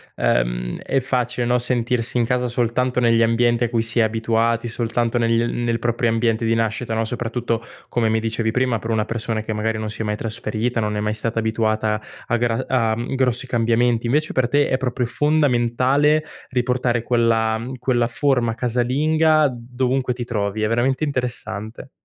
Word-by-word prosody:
ehm, - - 0
è 135 - 0
facile, 125 -2 -1
no, 125 0 +3
sentirsi 120 0 0
in 115 - +2
casa 125 +1 0
soltanto 125 +1 0
negli 115 -1 +4
ambienti 120 +1 +2
a 120 - 0
cui 115 -1 +1
si 115 +1 -2
è 115 - +5
abituati, 115 +1 0
soltanto 115 +1 -1
negli, 115 -1 +2
mhmm, 120 0 -2
nel 115 -1 0
proprio 120 0 0
ambiente 115 0 +1
di 115 - +2
nascita, 115 +1 -1
no, 110 0 0
soprattutto, 115 0 -2 0.3
come 115 -2 +1
mi 110 0 +2
dicevi 115 0 -1
prima, 125 0 +1
per 115 +1 -5
una 110 -1 +1
persona 115 -1 -2
che 110 +1 -4
magari 110 +1 -1
non 110 0 -3
si 110 - -5
è - - 0
mai 105 0 -1
trasferita, 115 +1 -2
non 105 -1 -1
è - - -1
mai 105 0 -1
stata 115 +1 -1
abituata 110 -1 0 0.3
a 120 - +1
gra 115 -1 0
a, 115 -4 +1
mhmm, 120 +3 -4
grossi 130 0 +1
cambiamenti. 115 0 +1
Invece 150 +6 +1
per 130 -2 +2
te 145 +3 +2
è 130 - +2
proprio 125 -1 -2
fondamentale 145 +1 +2 0.3
riportare 125 -1 0
quella, 115 -2 +2
mhmm, 125 +3 -6
quella 120 -2 +1
forma 125 -2 +1
casalinga 145 +6 +2
dovunque 125 +2 -1
ti 120 -1 -5
trovi. 105 -2 -2
È 110 - +2
veramente 130 +5 +1
interessante. 125 -4 -4
120 Hz, 185 wpm, -21 LUFS, 115-125 Hz, 0.3 s, è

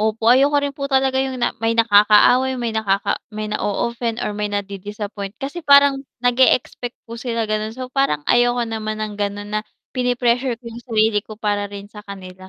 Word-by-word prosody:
Opo, 220 +1 -1
ayoko 280 +3 +4
rin 285 -1 0
po 275 0 -5
talaga 265 -1 +2
yung 265 -1 -2
na 240 - 0
may 225 0 0
nakaaway, 230 +4 +5
may 240 -2 -3
nakaka 205 -3 0
may 215 -1 -5
na-o-offend 235 +3 -2
or 210 - -2
may 210 0 -3
nadi-disappoint 205 0 -5
kasi 280 +8 -6
parang 280 -2 +5 0.2
nag-e-expect 245 0 +2
po 230 0 -9
sila 230 -3 -2
ganon. 215 +1 -3
So, 255 0 -7
parang 270 - 0
ayoko 240 +3 +3
naman 215 -1 -4
ng 210 -1 -7
ganun 205 +1 -3
na 215 - 0 0.3
pine-pressure 245 0 0
ko 235 - -33
yung 235 0 -8
sarili 220 -3 +1
ko 215 +1 -12
para 205 -1 -1
rin 200 0 -10
sa 210 - -9
kanila, 190 -2 -11
225 Hz, 185 wpm, -20 LUFS, 210-250 Hz, 0.3 s, nakaaway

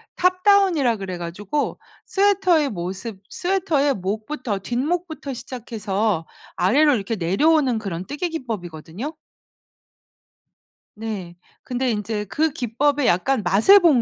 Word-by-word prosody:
탑다운이라 365 - +3
그래 185 -3 -5
가지고 190 - -3 0.3
스웨터의 380 -6 +3
모습 190 +2 -5
스웨터의 340 -7 +1
목부터 215 +3 -3
뒷목부터 295 - -2
시작해서 215 -7 -2 0.3
아래로 280 +9 +4
이렇게 215 +1 -2
내려오는 255 - +2
그런 190 -5 -4
뜨개 295 +5 -3
기법이거든요. 215 - -5 1.8
네. 210 -6 -5 0.3
근데 255 +1 -1
인제 210 0 -2
그 310 +9 0
기법의 270 +3 +1
약간 215 +7 +2
맛을 210 - +6
본 310 -10 +5
245 Hz, 280 characters per minute, -22 LUFS, 195-305 Hz, 1.8 s, 맛을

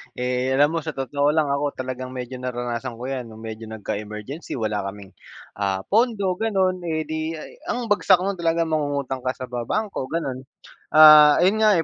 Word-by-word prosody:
Eh, 125 +1 -1
alam 145 +2 +4
mo, - - +1
sa 160 - -3
totoo 140 +2 0
lang 155 -2 +1
ako 140 +1 -1
talagang 130 0 -6
medyo 125 0 -6
naranasan 120 -1 -4
ko 125 +3 -6
'yan 130 -2 -3
no'ng 110 0 -12
medyo 110 0 -7
nagka-emergency, 105 +6 -6
wala 105 -4 -2
kaming, 100 -1 -9 0.5
ah, 100 -1 -1
pondo, 215 -3 +2
gano'n, 190 -4 +1
eh, 160 -2 -1
'di 155 +1 -4
ay 155 - -9 0.2
ang 245 -9 -3
bagsak 195 -3 +4
no'n 195 +1 -2
talaga 165 0 +1
mangungutang 145 -4 -2
ka 130 - 0
sa 130 -1 -8
ba 120 -1 -3
bangko 210 -11 -2
gano'n. 135 -5 -3 0.6
Ah, 150 -1 +9
ayun 200 +4 +3
nga, 215 -2 +5
eh, 165 - +1
140 Hz, 190 wpm, -23 LUFS, 125-165 Hz, 0.6 s, Ah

